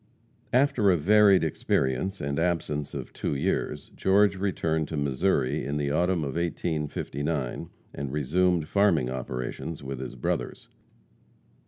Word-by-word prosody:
After 125 -5 +3
a 90 - +4
varied 100 +3 +5
experience, 80 +3 0
and 70 +1 -2
absence 80 -4 -1
of - - -6
two - - -2
years, 85 +8 -2
George 100 +1 +3
returned 80 -5 -1
to 80 - -4
Missouri 70 0 +1
in 70 +2 -2
the 70 -1 -1
autumn 85 +2 +1
of 70 -2 -3
1859, 75 -4 -2 0.2
and 70 -2 -5
resumed 80 +3 +1
farming 85 -11 +2
operations 65 +4 -5
with 65 -1 -5
his 65 -1 -6
brothers. - - -3
80 Hz, 130 wpm, -27 LUFS, 70-95 Hz, 0.2 s, varied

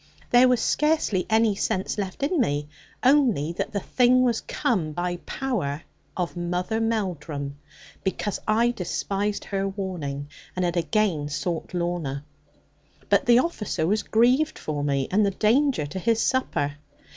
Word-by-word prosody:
There 245 +1 +7
was 250 -2 +3
scarcely 300 - +1
any 220 -1 +4
sense 195 +1 -1
left 195 +6 -4
in 325 +3 +1
me, 145 -7 0 0.4
only 250 - +3
that 180 - -3
the 205 - -1
thing 255 +3 +3
was 235 -3 +1
come 170 -10 -1
by 175 +2 -2
power 175 - -2 0.3
of 180 -1 -2
Mother 180 +5 -1
Melldrum, 165 -11 -2 0.4
because 195 +1 -2
I 230 +3 +3
despised 200 0 -2
her 195 -1 -1
warning, 175 -8 -4 0.3
and 180 0 0
had 175 0 -1
again 165 -2 +1
sought 170 +4 -3
Lorna. 170 -6 -2 0.9
But - - +3
the 240 0 +7
officer 240 - 0
was 210 +5 +1
grieved 250 +7 +2
for 145 -2 -3
me, 140 -2 0
and 210 +3 +3
the 200 - +3
danger 230 - +2
to 170 +6 -5
his 225 +3 +1
supper. 150 - 0
195 Hz, 145 wpm, -25 LUFS, 165-230 Hz, 0.9 s, There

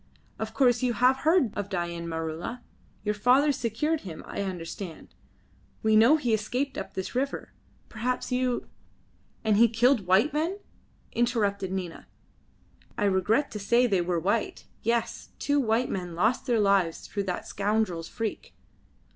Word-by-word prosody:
Of 220 0 -4
course 245 -3 +4
you 250 -2 +1
have 250 +4 +4
heard 310 - +3
of 200 -1 -3
Dain 170 -3 -3
Maroola. 165 +8 -4 0.4
Your 210 0 0
father 255 +7 +4
secured 275 +6 -1
him, 170 -5 -8
I - - -4
understand. 180 -2 -6 0.7
We 220 0 +4
know 235 +8 +7
he 245 -7 0
escaped 250 +6 -1
up 195 - -6
this 190 - -4
river. 270 +3 -2 0.3
Perhaps 250 +4 -3
you 250 -1 0 0.4
" - - -37
"And 215 -2 +3
he 235 +2 +7
killed 235 -2 +3
white 195 +11 +4
men!" 325 +6 0 0.5
interrupted 205 -5 0
Nina. 185 -3 -5 0.9
"I - - 0
regret 205 +9 +2
to 210 - -5
say 235 +5 +3
they 195 -6 +2
were 175 -1 0
white. 205 +6 -1 0.2
Yes, 230 0 -1
two 285 0 +1
white 235 0 +1
men 180 -3 -4
lost 225 +10 +1
their 235 -3 +2
lives 195 -5 +2
through 200 -2 -3
that 180 -2 -3
scoundrel's 200 -5 -1
freak." 225 -2 -5
220 Hz, 155 wpm, -27 LUFS, 190-250 Hz, 0.9 s, know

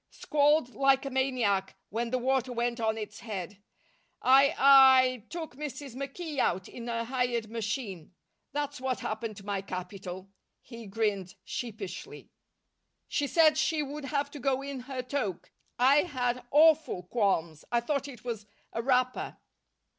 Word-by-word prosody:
Squalled 295 -3 +2
like 275 0 +3
a 275 - -4
maniac 245 -8 0
when 230 +3 -2
the 255 - 0
water 260 0 0
went 240 0 -1
on 220 -1 0
its 215 -1 -6
head. 205 -2 -6 0.6
I 275 +4 +5
I 260 -3 +7
took 325 -6 -6
Mrs. 280 -3 -6
McKee 280 +3 -5
out 190 -6 +1
in 240 0 -8
a 230 0 -2
hired 245 -3 -1
machine. 210 - -4 0.4
That's 290 -1 -3
what 260 -1 -2
happened 215 -1 -4
to 200 - -11
my 200 -2 -2
capital." 185 0 -7 0.3
He 230 -3 -11
grinned 200 -3 -1
sheepishly. 220 - -6 0.8
"She 285 - 0
said 310 0 +5
she 305 0 +1
would 290 +1 -6
have 280 +1 -1
to 295 - -8
go 270 0 0
in 280 -1 -5
her 255 0 -5
toque. 250 -9 -3 0.3
I 265 +4 +5
had 250 -6 0
awful 310 - +4
qualms. 180 -6 0
I 240 - +3
thought 280 +3 -2
it 245 -6 -11
was 225 -4 -5 0.3
a 230 - -1
wrapper." 255 0 0
250 Hz, 150 wpm, -29 LUFS, 215-275 Hz, 0.8 s, I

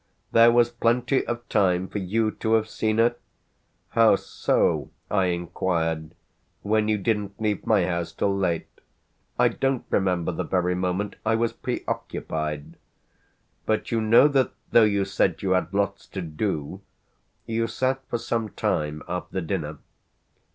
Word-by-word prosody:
"There 115 +1 +7
was 120 0 +4
plenty 120 +3 +1
of 120 0 -4
time 95 -3 +2
for 105 - -4
you 110 +4 0
to 110 0 -1
have 110 -1 +3
seen 110 0 -1
her? 120 +1 +3 0.7
How 115 -3 +5
so," - - 0 0.2
I 95 -2 +3
inquired, 85 -2 -2 0.5
"when 105 +1 +1
you 110 -1 +2
didn't 105 -1 -2
leave 105 -2 -1
my 105 -5 +4
house 85 -2 -2
till 100 -1 0
late? 90 -4 0 0.7
I - - +4
don't 135 -2 -1
remember 90 -2 +1
the 80 - -3
very 90 -1 0
moment 90 +3 -2
I 110 +1 +2
was 115 0 0
preoccupied. 75 0 -4 0.9
But 110 - 0
you 115 -1 +1
know 115 +6 +6
that 135 -3 +1 0.2
though 115 - +7
you 100 -2 +1
said 95 -2 0
you 95 - 0
had 90 -2 +1
lots 100 0 -1
to 95 - -5
do 80 +1 -3 0.6
you 115 0 -1
sat 130 +3 -1
for 120 - 0
some 115 -1 -2
time 75 -4 -2
after 90 +2 -3
dinner. 80 -4 -3
100 Hz, 150 wpm, -25 LUFS, 90-115 Hz, 0.9 s, There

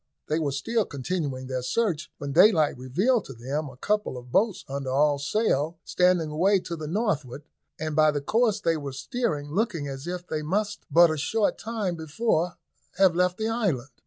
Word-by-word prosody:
They 155 +2 +1
were 150 -3 -1
still 220 - 0
continuing 140 -2 -3
their 130 -1 -3
search, 170 - -1
when 140 -1 -5
daylight 160 -1 +5
revealed 190 - +1
to 135 - -8
them 140 +6 -3
a 130 - -14
couple 210 -2 -1
of 125 0 -11
boats 205 - +1
under 135 -1 -4
all 145 +2 +2
sail, 155 0 0
standing 180 -4 +2
away 190 +6 +3
to 170 - -5
the 155 -2 -6
northward, 155 - -2 0.4
and 155 -1 -3
by 155 0 +5
the 150 -1 0
course 220 +8 +1
they 165 -5 +1
were 140 -3 -6
steering 150 - -3
looking 180 -5 -1
as 135 +3 -6
if 180 0 -4
they 155 -3 -3
must 205 +6 -2
but 170 -1 +6
a 155 - -2
short 210 +8 0
time 215 -6 -2
before 165 +2 -1 0.4
have 190 -2 +5
left 180 0 +2
the 220 - -1
island. 185 - -1
160 Hz, 190 wpm, -26 LUFS, 140-205 Hz, 0.4 s, but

